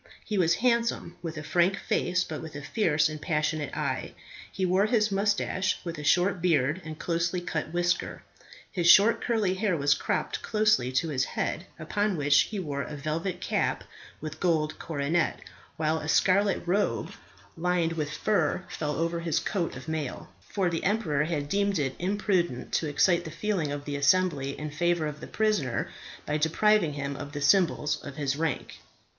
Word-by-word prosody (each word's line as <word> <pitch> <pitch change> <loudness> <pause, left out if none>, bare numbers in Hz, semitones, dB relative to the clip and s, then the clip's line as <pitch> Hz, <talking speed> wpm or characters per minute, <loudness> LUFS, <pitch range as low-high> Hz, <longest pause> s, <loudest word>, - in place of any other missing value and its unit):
He 215 - -3
was 170 -1 +4
handsome, 235 -7 +1
with 165 -2 -5
a 155 - -5
frank 180 +4 +2
face, 180 0 0
but 155 - -6
with 160 -2 -9
a 145 - -6
fierce 160 -5 +2
and 155 -1 -6
passionate 155 -2 -1
eye. - - -2 0.4
He 190 - -1
wore 185 +3 +3
his 215 -3 +2
moustache 195 -1 +1
with 170 -2 -5
a - - -6
short 180 +4 +2
beard 155 -1 +2
and 155 0 -7
closely 170 +2 -1
cut 160 -3 -3
whisker. 175 +1 -1 0.5
His 175 -3 +2
short 210 +6 +7
curly 220 -6 +1
hair 190 -2 0
was 145 0 +4
cropped - - -2
closely 210 - +2
to 160 +5 +1
his 130 -4 0
head, 175 - -3
upon 200 +4 -1
which 145 -1 +3
he 215 - -4
wore 145 -6 -3
a 150 - -6
velvet 160 +5 -3
cap - - 0 0.4
with 155 0 -6
gold 160 -4 0
coronet, 155 +2 0 0.4
while 155 0 +1
a 155 - -6
scarlet 195 +4 +3
robe 195 +4 0 0.4
lined 170 -1 +1
with 155 -3 -2
fur 175 +1 0
fell 150 -1 -3
over 170 +1 -1
his 165 -2 -1
coat 175 -5 -2
of 130 - -9
mail, 155 -4 -4
for 185 - -2
the 170 -1 -2
emperor 175 -8 +1
had 155 -3 -2
deemed 200 +4 +1
it 135 -3 -1
imprudent 185 - 0
to 160 - 0
excite 175 +4 +3
the 160 - -6
feeling 170 -2 -1
of 145 0 -5
the 145 - -3
assembly 140 -2 +2
in 150 0 -5
favour 170 +2 +1
of 150 0 -5
the - - -8
prisoner 210 - 0 0.3
by 150 - 0
depriving 165 +2 +3
him 140 -1 -4
of 145 +1 -7
the 145 - -4
symbols 150 -1 +2
of 140 - -8
his 140 -2 -1
rank. 160 -2 -3
165 Hz, 180 wpm, -28 LUFS, 150-185 Hz, 0.5 s, short